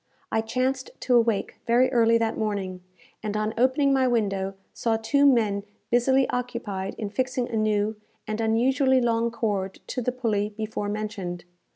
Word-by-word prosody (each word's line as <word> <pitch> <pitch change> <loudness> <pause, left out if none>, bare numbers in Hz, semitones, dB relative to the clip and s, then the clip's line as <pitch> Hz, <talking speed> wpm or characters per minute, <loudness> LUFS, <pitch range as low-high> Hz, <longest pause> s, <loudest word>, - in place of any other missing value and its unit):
I 220 - +2
chanced 255 +3 -1
to 250 - +2
awake 230 -3 +1
very 245 +3 +4
early 230 -2 +4
that 225 -1 0
morning, 195 -4 -3 0.4
and 210 -1 -2
on 215 +1 -1
opening 270 +3 +3
my 260 -1 +3
window 195 -5 0 0.2
saw 225 -1 0
two 280 +6 +3
men 215 -6 +3 0.3
busily 260 +2 +3
occupied 235 -6 -3
in 210 -3 -4
fixing 255 +2 -1
a - - -3
new 215 0 +1 0.3
and 215 +1 -3
unusually 260 +4 +3
long 235 -1 +1
cord 205 -5 -2
to 250 - -3
the 250 - 0
pulley 215 -4 -1
before 215 -1 -3
mentioned. 200 -5 -4
225 Hz, 160 wpm, -25 LUFS, 210-250 Hz, 0.4 s, very